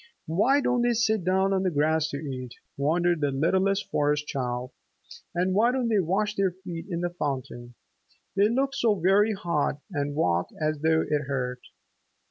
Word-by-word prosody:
"Why 215 - +3
don't 245 -2 +1
they 240 0 +2
sit 220 -3 +1
down 190 +2 +2
on 190 - +1
the 190 - +1
grass 155 0 +1
to 140 - -4
eat?" 130 -4 -6 0.2
wondered 170 +3 +1
the 145 - +2
littlest 190 +8 +1
Forest 150 0 +1
Child. 125 -2 -3 0.6
"And 180 +2 +1
why 225 +5 +4
don't 250 -2 0
they 215 -3 +3
wash 195 +4 0
their 195 -2 +1
feet 175 -2 -8
in 170 -2 -2
the 175 0 -1
fountain? 130 -6 -5 0.6
They 200 +2 +4
look 270 +3 0
so 230 -6 +2
very 200 +4 +3
hot 170 -7 -1
and 145 -3 -2
walk 90 - +1
as 155 -1 -1
though 160 +1 +2
it 150 -1 0
hurt!" 125 -2 -2
170 Hz, 175 wpm, -26 LUFS, 145-195 Hz, 0.6 s, why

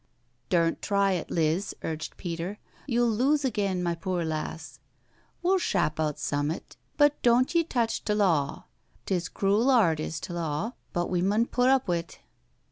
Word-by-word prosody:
"Dumt 170 -2 +2
try 200 -1 +2
it, 180 -3 -2
Liz," 165 +4 0
urged 160 -1 -4
Peter. 175 +3 -4 0.3
"You'll 240 -2 +2
lose 275 +6 +2
agen, 200 -7 0
my 170 -1 0
poor 175 0 -2
lass. 155 -3 -5 0.6
We'll 375 +2 +3
shap 155 - 0
out 155 -2 0
summat, 145 +3 -3 0.2
but 290 -1 +4
doant 245 +4 +3
ye 335 -1 +4
touch 235 -7 -1
t'law 185 -10 +1 0.2
— 100 +6 -35
'tis 180 -2 -1
crool 205 +6 +2
'ard 195 - +4
is 155 0 -3
t'law, 170 +4 -3 0.2
but 175 +1 -2
we 180 -1 +1
mun 205 +5 +2
put 250 +1 +2
up 265 -1 +4
wi't." 170 -1 -2
185 Hz, 155 wpm, -27 LUFS, 165-235 Hz, 0.6 s, but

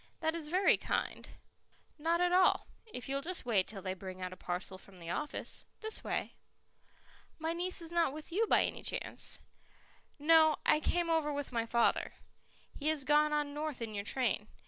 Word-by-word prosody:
"That 320 0 +1
is 330 -3 -4
very 370 +5 +4
kind - - -2 0.4
" - - -43 0.3
"Not 335 +3 +2
at 355 0 +3
all, 365 0 +5 0.2
if 250 - -7
you'll 275 +1 -1
just 355 +1 -4
wait 205 -6 +2
till 195 -3 -7
they 185 -1 -1
bring 185 0 -8
out 185 0 -4
a - - -9
parcel 185 +1 -4
from 195 -1 -13
the 170 -1 -6
office. 300 +7 -3 0.2
This 440 0 -3
way." - - -2 1.0
"My 320 +1 -1
niece 350 0 -3
is 330 - -10
not 340 -4 +3
with 305 +3 -8
you 435 +6 +2
by - - +5
any - - -3
chance?" - - -2 0.8
"No; 315 0 +6
I 305 - +5
came 340 +2 +1
over 315 -2 +2
with 285 -1 -3
my 230 -1 -1
father. 235 0 +2 0.6
He 295 - -4
has 310 -3 +2
gone 300 +2 +4
on 295 -1 0
north 300 -2 -3
in 225 -2 -4
your 200 -1 -3
train. 220 -2 0
300 Hz, 190 wpm, -34 LUFS, 230-330 Hz, 1.0 s, No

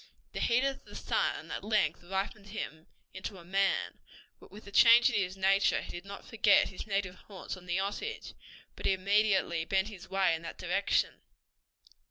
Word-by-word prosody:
The - - -4
heat 240 +2 +2
of 275 0 -2
the - - -13
sun - - -1
at - - -4
length 210 -1 +1
ripened 195 +3 -4
him 160 -6 -6 0.3
into 190 +1 -6
a 170 - -13
man, 195 +2 0 0.4
but - - -16
with 210 - -12
the 200 - -11
change 235 +5 +7
in - - -2
his 190 -2 -1
nature 195 +1 +3
he - - -8
did 175 +2 -8
not 200 0 -9
forget 210 -2 +4
his 190 - -8
native 195 -2 -1
haunts 190 +1 -8
on 180 -1 -14
the 175 +1 0
Osage, 205 - -4 0.4
but - - -3
immediately 195 -3 +2
bent 190 +4 0
his 195 -5 -11
way 195 -2 +2
in 165 - -3
that 165 - -8
direction. 185 +3 0
195 Hz, 185 wpm, -31 LUFS, 185-210 Hz, 0.4 s, change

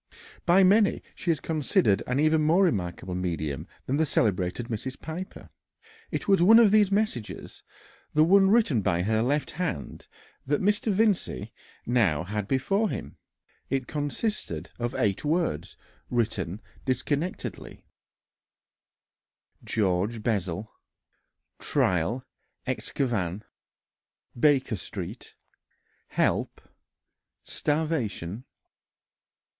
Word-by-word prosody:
By 180 +3 +6
many 200 +2 +4
she 175 - -5
is 160 -4 +2
considered 140 -11 +1
an 125 +2 0
even 155 +1 +3
more 165 +6 +4
remarkable 90 - -1
medium 80 -4 -3 0.2
than 135 - 0
the 160 - +3
celebrated 100 -2 0
Mrs. 120 +3 -5
Piper. 175 +4 -7 0.6
It - - -4
was 195 -3 +4
one 215 +6 +8
of 225 -4 +7
these 210 -2 +4
messages, 200 - -2 0.5
the 155 - +6
one 195 +3 +5
written 200 - +3
by 85 -2 +1
her 110 +2 +1
left 140 +3 0
hand, 165 - -4 0.4
that 145 +2 0
Mr. 210 +2 +1
Vincey 200 - 0 0.3
now 105 -11 +2
had 105 +2 -3
before 195 - +1
him. - - -6 0.5
It 135 -1 0
consisted 145 - -3
of 120 +2 -2
eight 105 -7 0
words 145 - -1 0.3
written 110 -5 -1 0.2
disconnectedly: 145 +6 -3 1.8
"George 105 +2 0
Bessel... 100 -2 -2 0.9
trial 95 +8 0 0.4
excavn... 105 -7 -2 0.9
Baker 130 -4 +3
Street... - - -7 0.7
help... - - 0 0.8
starvation." 130 - -2
130 Hz, 100 wpm, -27 LUFS, 100-170 Hz, 1.8 s, one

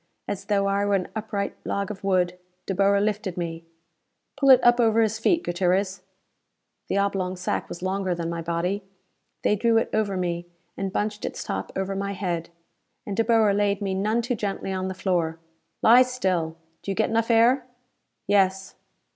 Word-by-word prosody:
As 195 -1 -4
though 200 -1 +1
I 200 +1 +1
were 205 0 +2
an 185 -2 -1
upright 210 -2 -3
log 200 0 -2
of 195 -2 -9
wood, 180 -2 +1 0.3
De 195 - -2
Boer 200 +1 +3
lifted 205 -3 -1
me. 165 -1 -4 0.7
"Pull 275 -1 +2
it 260 - +9
up 240 0 +5
over 225 -1 +4
his 220 0 0
feet, 335 +9 +2
Gutierrez." 185 +2 0 0.9
The 195 - 0
oblong 195 -2 0
sack 180 0 -3
was 175 - -7
longer 190 -1 -1
than 170 -1 -3
my 170 0 -3
body. 170 +4 -1 0.6
They 210 - +3
drew 230 +2 +2
it 225 - 0
over 205 -3 0
me, 175 -1 -2 0.3
and 195 -1 -3
bunched 210 +1 -2
its - - -4
top 95 0 -4
over 195 0 -2
my 200 +1 -2
head. 175 -4 -3 0.6
And 200 - -4
De 225 - +2
Boer 225 -2 +4
laid 200 -1 +1
me 195 -2 -2
none 215 +5 0
too 245 +2 -1
gently 200 -3 -3
on 185 0 -2
the 190 - -4
floor. 170 -4 0 0.5
"Lie 240 +3 +8
still. 185 -11 0 0.2
Do - - -7
you 195 - -1
get 220 - +1
enough 230 +1 +1
air?" 240 +3 +4 0.6
"Yes." 195 -1 +2
195 Hz, 185 wpm, -25 LUFS, 185-215 Hz, 0.9 s, it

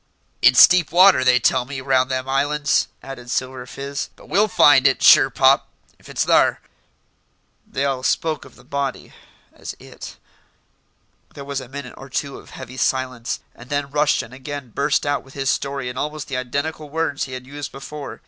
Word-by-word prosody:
"It's - - +9
deep 180 -5 +1
water, 185 -4 +6
they 125 -1 +4
tell 125 +1 +2
me, 135 +1 -7
round 130 -1 +1
them 130 0 -2
islands," 145 +2 +1 0.2
added 125 -2 -9
Silver 130 0 -3
Fizz; 140 +2 -5
"but - - -17
we'll 205 +4 +2
find 145 -8 +5
it, 135 - 0
sure 135 - +7
pop, 135 +1 +3 0.3
if - - -17
it's - - -1
thar." - - +3 1.1
They 135 - -2
all 135 -2 -1
spoke 155 +4 -1
of - - -16
the 125 - -18
body 140 0 -4 0.4
as - - -8
"it." - - -11 1.2
There 140 - -8
was 140 -1 -4
a 125 - -11
minute 140 -1 -8
or 135 - -11
two 140 +1 -4
of - - -16
heavy 130 0 -10
silence, 130 -3 -2
and 120 +2 -15
then 145 -1 -2
Rushton 145 -4 0
again 135 -1 -7
burst 140 +5 0
out 145 -1 0
with 135 - -18
his 135 -1 0
story 140 -2 -3
in 125 +1 -5
almost 150 0 -4
the 135 - -2
identical 140 +4 -4
words 160 -1 -2
he 130 - -9
had 130 0 -7
used 145 +1 -7
before. 140 +1 -8
135 Hz, 185 wpm, -21 LUFS, 130-145 Hz, 1.2 s, It's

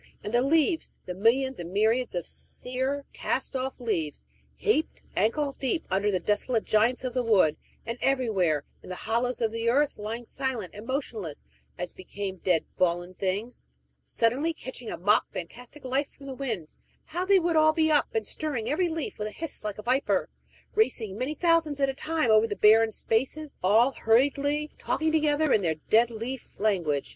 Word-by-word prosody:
And 210 - -5
the 240 - +4
leaves 320 +4 +2 0.2
the 180 - -4
millions 250 +7 +2
and 170 0 -6
myriads 220 +3 +1
of 175 -2 -2
sere, 260 +3 -4
cast - - -2
off 265 +1 -3
leaves, 165 - -2 0.3
heaped 420 -8 0
ankle 280 +6 +1
deep 275 +4 -2
under 200 +2 +2
the 190 -3 +1
desolate 210 +5 +1
giants 225 +5 +2
of 255 -2 -3
the 250 - +1
wood, 195 -10 +4 0.3
and 230 +1 -4
everywhere, 195 - +1 0.2
in - - -12
the 185 - -4
hollows 235 +6 -1
of 225 -1 +1
the 230 +1 0
earth, 285 +2 +2
lying 225 +3 -5
silent 255 -7 -3
and 210 +3 -10
motionless, 225 - -4 0.3
as 180 0 -4
became 190 +1 -6
dead, 175 -2 +1
fallen 175 0 0
things 200 - -3 0.3
suddenly 250 - +1
catching 255 -5 -7
a - - -4
mock 205 +5 +2
fantastic 245 - -8
life 265 +3 0
from 275 - -15
the 270 - -5
wind, 230 - -3 0.4
how 345 +3 -3
they 390 +1 +5
would 340 -2 +1
all 310 0 +6
be 315 0 +2
up 295 - +3
and 220 -2 0
stirring, 285 -8 -3
every 345 +4 +1
leaf 320 -7 -4
with 210 - -2
a - - -6
hiss 320 +1 -4
like 210 -1 -4
a 210 - -8
viper, 255 +4 +1 0.4
racing, 230 - +1
many 255 +7 -2
thousands 330 -3 +2
at 275 -1 +3
a - - -1
time, 310 -3 0
over 215 +1 +5
the 205 - -3
barren 220 +2 +5
spaces, 270 +8 -1
all 220 +8 +4
hurriedly 285 +6 +2
talking 315 0 0
together 305 -1 +2
in 215 - +4
their 165 -4 0 0.2
dead 230 +2 +6
leaf 235 +3 -6
language! 175 -10 +1
240 Hz, 185 wpm, -27 LUFS, 210-285 Hz, 0.4 s, all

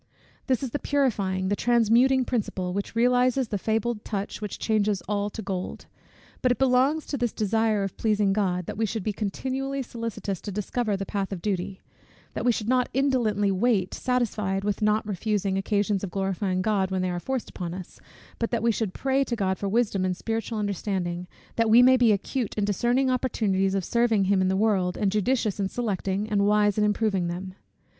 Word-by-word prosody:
This 260 -1 +1
is 260 - -3
the 290 - -2
purifying, 200 -10 0
the 205 - +2
transmuting 240 +3 +3
principle, 190 -7 -2
which 200 +3 -4
realizes 250 +1 +3
the 205 - -2
fabled 220 +1 -1
touch, 200 0 -4
which 210 -2 -4
changes 210 -3 0
all 205 0 -1
to 220 +1 -7
gold. 190 -2 -4 0.6
But 255 - +3
it 245 - +1
belongs 270 +4 +2
to 280 - -4
this 240 -2 0
desire 220 0 +1
of 195 - -4
pleasing 210 -3 +2
God, 180 -3 0
that - - -6
we 225 - +2
should 220 0 -3
be 215 - -1
continually 265 +7 -3
solicitous 230 -5 -5
to 205 - -5
discover 210 +1 -1
the 195 - -4
path 195 0 -3
of 195 - -4
duty; 190 -1 -2 0.5
that - - -3
we 245 - +4
should 220 -2 -3
not 250 0 +2
indolently 235 -7 +2
wait, 195 -1 +1
satisfied 210 -6 -1
with 205 +1 -1
not 215 +1 +2
refusing 200 -1 -1
occasions 200 0 0
of 195 - -3
glorifying 190 -1 -1
God, 200 -3 +1
when 190 -1 -1
they 185 - 0
are 175 - -2
forced 260 +5 -3
upon 175 -2 -5
us; 185 -2 -9 0.4
but 230 - 0
that 235 -2 -1
we 235 - +4
should 215 -3 -2
pray 270 0 +1
to 240 - -2
God 190 -4 -1
for 200 - -2
wisdom 205 -3 +1
and 185 -1 -1
spiritual 225 +1 -3
understanding, 185 -3 -2 0.3
that 230 -1 +2
we 235 +3 +7
may 260 +1 +7
be, 245 -3 +4
acute 215 +3 -1
in 205 - +1
discerning 245 +6 +1
opportunities 200 -7 0
of 190 -3 -1
serving 235 -4 +2
him 190 0 +2
in 185 - +2
the 190 0 +1
world, 195 -4 +1
and 200 -2 +1
judicious 215 0 0
in 195 -1 0
selecting 205 -3 -2
and 205 -1 +2
wise 210 0 +3
in - - +3
improving 210 -3 +1
them. 185 +2 -5
210 Hz, 200 wpm, -26 LUFS, 195-235 Hz, 0.6 s, we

